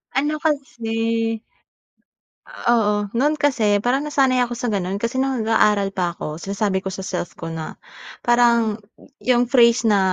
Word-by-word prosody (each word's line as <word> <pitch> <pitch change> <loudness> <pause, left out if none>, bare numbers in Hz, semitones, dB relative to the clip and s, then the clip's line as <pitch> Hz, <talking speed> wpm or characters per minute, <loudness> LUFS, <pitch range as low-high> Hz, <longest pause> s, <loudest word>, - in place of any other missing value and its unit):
Ano 295 +3 0
kasi. 230 -6 -1 1.1
Oo, 210 -4 0
no'n 295 +5 +2
kasi 230 -9 +2
parang 255 +3 +1
nasanay 270 -3 +2
ako 245 -1 -1
sa 235 0 -2
gano'n 195 -1 -2
kasi 230 +5 -2
no'ng 265 -3 0
nag-aaral 210 -2 +2
pa 175 -3 -2
ako 155 -1 -6
sinasabi 195 +1 -1
ko 190 - -4
sa 190 0 -6
self 180 -2 -4
ko 165 -1 -7
na 160 -1 -6 0.5
parang 235 -2 +3 0.4
yung 245 -1 +2
phrase 235 -1 +4
na 210 -3 +4
225 Hz, 150 wpm, -21 LUFS, 200-250 Hz, 1.1 s, phrase